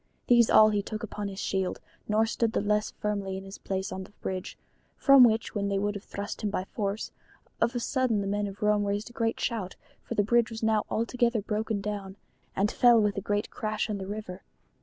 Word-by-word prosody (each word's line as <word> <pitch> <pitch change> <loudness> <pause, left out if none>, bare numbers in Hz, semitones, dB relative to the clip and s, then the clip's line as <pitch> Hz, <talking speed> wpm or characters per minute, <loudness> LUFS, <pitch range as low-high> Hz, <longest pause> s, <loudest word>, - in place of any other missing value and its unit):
These 240 -2 +5
all 215 0 +7
he 205 -1 +1
took 215 +2 -6
upon 210 -1 -4
his 195 -1 -7
shield, 190 -1 -1 0.3
nor 215 +1 +3
stood 225 0 0
the - - +2
less 210 +1 +1
firmly 200 -2 -3
in 190 - -7
his 195 +1 -10
place 190 0 -3
on 190 0 -5
the - - -13
bridge, 185 -2 -5 0.4
from 275 -2 +7
which 225 -1 +3
when 200 -2 -1
they 200 0 0
would 205 +1 0
have 205 -1 -7
thrust 200 +1 -6
him 210 - 0
by 190 -2 -2
force, 200 +1 -3 0.5
of 235 - +2
a - - +1
sudden 255 -3 +1
the 200 - -2
men 205 +1 -1
of 200 +1 -7
Rome 210 -1 +3
raised 205 +3 -2
a - - -19
great 230 -3 -1
shout, 215 -7 -2 0.3
for 235 - -6
the 205 - +3
bridge 235 +2 +3
was 225 0 -7
now 220 -1 +2
altogether 235 -1 0
broken 215 0 -2
down, 200 -2 -5 0.4
and 200 +2 +1
fell 240 -2 +6
with 210 -2 +1
a 200 - -2
great 205 +2 -1
crash 215 0 -2
into 200 -2 -3
the - - -9
river. 200 -3 -6
210 Hz, 225 wpm, -28 LUFS, 200-225 Hz, 0.5 s, all